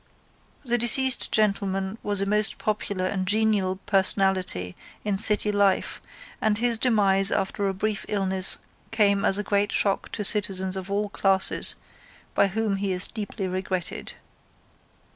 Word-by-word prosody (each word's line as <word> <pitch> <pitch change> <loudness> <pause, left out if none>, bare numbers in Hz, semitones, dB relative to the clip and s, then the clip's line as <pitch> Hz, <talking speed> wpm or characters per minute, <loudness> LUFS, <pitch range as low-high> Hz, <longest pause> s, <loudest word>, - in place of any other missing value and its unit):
The 240 -1 0
deceased 260 +3 +5
gentleman 195 -1 -2
was 205 -1 +2
a - - -1
most 210 +2 +1
popular 200 -3 -4
and 185 0 -4
genial 205 -3 0
personality 190 - -1 0.3
in 200 -2 -1
city 210 0 +2
life 200 -2 -1 0.4
and 215 -1 0
his 235 0 0
demise 200 -5 +3
after 200 0 -2
a 195 - -3
brief 215 +1 -4
illness 190 -2 0 0.3
came 200 -3 +1
as 195 - +6
a 210 - -3
great 205 +1 -1
shock 195 -1 -1
to 210 - -4
citizens 195 -3 0
of 190 0 -8
all 205 +1 -3
classes 195 -2 +4 0.6
by 200 - +2
whom 205 0 -3
he 195 0 -3
is 180 0 +2
deeply 210 -2 -6
regretted. 185 -1 -5
200 Hz, 145 wpm, -23 LUFS, 190-210 Hz, 0.6 s, as